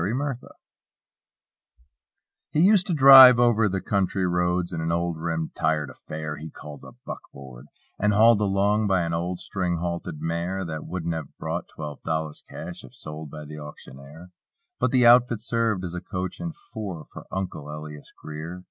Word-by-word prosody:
"UNCLE" 110 +7 -1
LIAS 135 -4 -3 2.1
He - - -1
used 190 +2 +5
to 175 - 0
drive 135 -3 +10
over 115 -3 +3
the 95 0 -2
"county 95 0 0
roads" 90 0 0
In 80 - -3
an 80 +1 -1
old 85 0 -1
rim 80 -1 -3
tired 75 -4 -1
affair 75 +3 -7
He 80 +1 -8
called 75 -1 -11
a - - -12
"buck - - -6
board;" 65 -1 -12 0.3
and 105 +1 +2
hauled 110 +1 +5
along 105 +1 +2
By 95 -3 +2
an 85 0 -2
old 85 +2 -2
string 90 -3 -2
halted 85 -2 -4
mare 85 +4 -2
That 80 -2 -6
wouldn't 85 -2 -3
have 80 -4 -7
brought - - -4
twelve 75 -2 -7
dollars 80 -1 -3
cash 85 +2 -8
If 65 - -14
sold 75 0 -8
by 75 +1 -9
the 75 +1 -9
auctioneer; 75 +3 -12 0.5
But - - +2
the 125 -3 +3
outfit 120 -1 +6
served 115 -4 0
as 90 -2 -5
a 90 - -5
"coach 90 -2 -5
and 170 -1 -5
four" 95 -8 -7
For - - -10
"Uncle" 90 -6 -5
Elias 75 -1 -9
Greer. 80 +4 -7
85 Hz, 175 wpm, -25 LUFS, 80-105 Hz, 2.1 s, drive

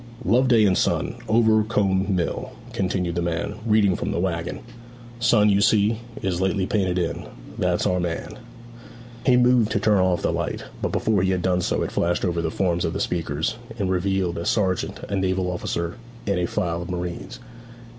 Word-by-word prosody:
'"Loveday 120 +2 +4
and 95 -2 +3
Son, - - 0 0.2
Overcombe 110 -4 +2
Mill,"' 85 -2 -2 0.2
continued 90 -2 -1
the 85 - -1
man, 85 +3 -2
reading 105 -4 +4
from - - -3
the - - -1
waggon. 85 -1 -2 0.6
'"Son," 115 -3 +4
you 100 -1 +3
see, 110 +1 +3 0.2
is 95 -2 -1
lately 95 0 +1
painted 95 -3 0
in. 85 -2 -2 0.3
That's - - +1
our 90 - +1
man.' 85 -2 -4 0.9
He 125 -1 +6
moved 125 -3 +4
to 110 - +1
turn 105 -1 +3
off 90 -1 +1
the - - +1
light, - - -3 0.2
but - - -1
before 110 -3 +1
he 95 - +1
had 90 -2 0
done 90 -1 +2
so - - 0
it - - -3
flashed 85 +2 0
over 85 -2 0
the 80 - -1
forms 85 0 0
of - - -1
the - - -3
speakers, 85 +5 -1 0.2
and 95 -4 -1
revealed 95 -2 0
a 85 - -4
sergeant, 95 -4 0
a 100 - -2
naval 95 -1 0
officer, 85 +1 -3 0.3
and 100 -3 0
a 90 - 0
file 85 -1 -2
of 85 - -7
marines. 90 -1 -5
95 Hz, 185 wpm, -23 LUFS, 85-105 Hz, 0.9 s, He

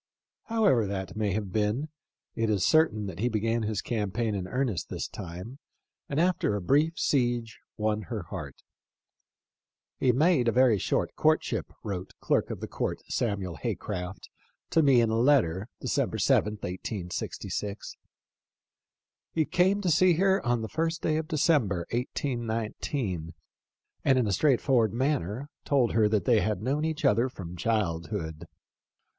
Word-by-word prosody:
However 170 - +3
that 95 0 -4
may 105 -3 0
have 100 -2 -3
been, 110 +9 0 0.4
it 115 -1 0
is 100 -4 +2
certain 155 -10 +3
that 95 -3 -7
he 120 +4 +1
began 115 +1 0
his 105 -2 -2
campaign 110 0 -1
in 95 -2 -3
earnest 125 -5 -1
this - - -3
time, 95 +8 -8 0.5
and 140 - 0
after 170 - +2
a - - -1
brief 150 - +2
siege 120 -4 0 0.2
won 110 0 0
her 110 -6 -3
heart. - - -8 0.7
" - - -65
He 130 - +4
made 140 0 +3
a - - +4
very 125 -4 +4
short - - 0
courtship," - - +1
wrote 95 -2 -5 1.0
Samuel 100 -7 -2
Hay - - -2
craft* 90 +2 -6 0.4
to 165 - +4
me 135 -5 +5
in 115 -1 +2
a 110 - +1
letter, 115 - +3
December - - -1
7, 105 - +3
1866. 100 +1 -5 1.4
"He 160 -1 +2
came 190 +7 +2
to 180 -4 +1
see 180 +3 +5
her 190 +3 +2
on 120 -1 0
the - - -3
first 165 +1 -1
day 155 -1 +1
of 160 0 -3
December, 135 - +2
1819, 115 - -3 0.7
and 135 -1 +4
in 125 - +2
a 105 - 0
straightforward 125 -4 +3
manner 130 - -1 0.2
told 130 -5 +2
her 110 -2 +3
that 105 -1 +1
they 120 -4 +5
had 105 -2 -1
known 145 +5 0
each 160 -1 -2
other 115 +5 +3
from 90 -7 -8
childhood. 85 -4 -2
115 Hz, 145 wpm, -28 LUFS, 100-140 Hz, 1.4 s, me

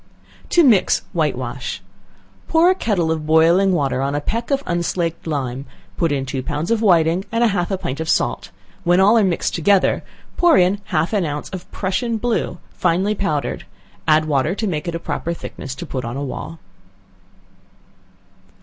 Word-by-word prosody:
To 345 - +5
Mix 225 - +4
White 155 -6 0
wash. 125 +1 -5 0.7
Pour 330 +3 +4
a - - +4
kettle 200 - 0
of 155 -1 -3
boiling 165 +5 +4
water 140 -6 0
on 140 +1 -1
a - - +1
peck 230 +10 -3
of 275 -1 0
unslaked 170 -1 -2
lime, 135 -3 -3 0.3
put 165 -3 0
in 135 -2 -1
two 130 0 -3
pounds 150 - -3
of 230 -1 +2
whiting, 175 -3 +3
and 230 +1 +1
half 195 -6 +1
a 195 - -1
pint 165 -6 -4
of 160 0 -3
salt, - - 0 0.3
when 175 0 +3
all 200 +4 +5
are 225 - +5
mixed 185 -3 0
together, 190 +3 +2 0.3
put 345 - +5
in 185 +3 +2
half 160 +6 -1
an 200 -3 +2
ounce 145 -2 -4
of 185 -2 -8
Prussian 225 +5 -1
blue, 235 +1 -1 0.2
finely 185 +4 +1
powdered, 160 -8 -2 0.4
add 155 0 +4
water 150 +3 +1
to 220 - -2
make 165 -5 -2
it 170 - -2
a - - -3
proper 170 0 -3
thickness 135 -5 -7
to 155 - -7
put 130 -5 -4
on 120 +3 -4
a 140 - -3
wall. 145 +4 -6
170 Hz, 180 wpm, -20 LUFS, 150-200 Hz, 0.7 s, To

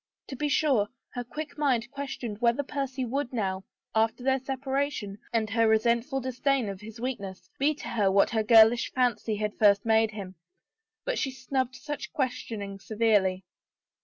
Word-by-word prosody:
To 270 - -5
be 295 +3 -1
sure 270 -9 +3 0.3
her 245 - -3
quick 300 +5 -7
mind 245 -5 +1
ques 280 -1 -5
tioned 215 -4 -6
whether 240 +4 +3
Percy 275 -2 -3
would 265 +2 -2
now, 195 -5 -2 0.3
after 225 +2 +1
their 265 0 +2
separation 265 -5 -2
and 225 -2 +1
her 225 +1 +3
resentful 235 +4 +2
disdain 260 -2 0
of 195 -1 -7
his 220 +1 -10
weakness, 220 -7 -5
be 295 +2 +2
to - - -8
her 205 -5 +2
what 195 +1 +4
her 220 -1 +2
girlish 225 +2 +6
fancy 235 -4 +1
had 210 0 -2
first 205 -1 +5
made 220 0 +4
him, 200 -3 -7 0.7
but - - -1
she 270 - 0
snubbed 260 0 -2
such 295 +1 -6
questioning 225 -8 -3
severely. 205 -4 +1
235 Hz, 165 wpm, -28 LUFS, 215-270 Hz, 0.7 s, girlish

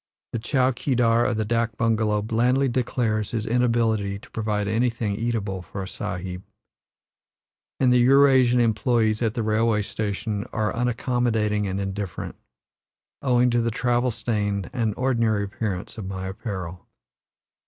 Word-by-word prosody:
The 115 - -1
chow 130 +2 +2
keedar 120 -2 +2
of 120 - -1
the 110 - 0
dak 115 0 0
bungalow 110 -2 +1
blandly 125 +5 +2
declares 120 -4 0
his 110 -2 -3
inability 115 -4 +1
to 120 +5 -16
provide 105 -2 -1
anything 110 -1 0
eatable 105 -4 -2
for 95 +2 -6
a - - -6
Sahib, 90 0 -5 1.4
and 125 -2 +4
the 125 - +5
Eurasian 130 -1 +5
employes 110 -1 +2
at 115 -1 0
the 115 - -1
railway 110 0 +2
station 105 0 -3
are 110 0 -1
unaccommodating 115 -3 0
and 95 +1 -2
indifferent, 95 -1 -4 0.9
owing 125 -2 +3
to 120 0 +2
the 115 - 0
travel 120 +2 +1
stained 105 -4 -2
and 115 -4 -1
ordinary 115 -5 +1
appearance 100 0 -4
of 95 - -5
my 95 0 -4
apparel. 95 -4 -6
110 Hz, 140 wpm, -24 LUFS, 105-120 Hz, 1.4 s, the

